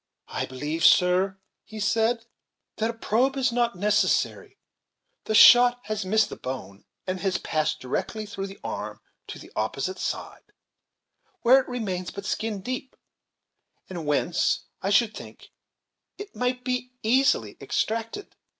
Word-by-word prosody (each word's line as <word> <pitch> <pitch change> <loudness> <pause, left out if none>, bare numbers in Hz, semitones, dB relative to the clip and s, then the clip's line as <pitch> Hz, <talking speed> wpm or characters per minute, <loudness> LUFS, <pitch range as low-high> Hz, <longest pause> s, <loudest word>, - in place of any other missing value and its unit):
"I - - -3
believe, 150 +5 -4
sir," 185 +2 +4 0.3
he 220 - -10
said, 225 +3 +1 0.5
"that 225 +1 0
a - - -3
probe 245 +4 0
is 260 -2 +2
not 235 -2 +1
necessary; 210 +3 0 0.7
the 220 - 0
shot 245 +2 +8
has 215 -2 -3
missed 215 +3 +2
the - - -6
bone, 125 -6 -7 0.2
and 185 0 -3
has 195 -1 0
passed 155 -1 -1
directly 215 - -3
through 200 -1 -5
the 195 0 -11
arm - - -5 0.3
to - - -7
the - - -13
opposite 375 - -2
side, - - -5 0.9
where 255 +3 +7
it 265 - -5
remains 190 -7 -3
but 200 0 -8
skin 215 -2 -2
deep, 255 +4 -5 1.0
and 170 -4 -5
whence, 150 +4 +1 0.2
I 195 - -1
should 220 +2 +3
think, - - -11 0.7
it 410 0 -9
might 250 0 -1
be 250 0 -3
easily 265 +5 +2
extracted." 230 - -3
215 Hz, 140 wpm, -26 LUFS, 185-245 Hz, 1.0 s, shot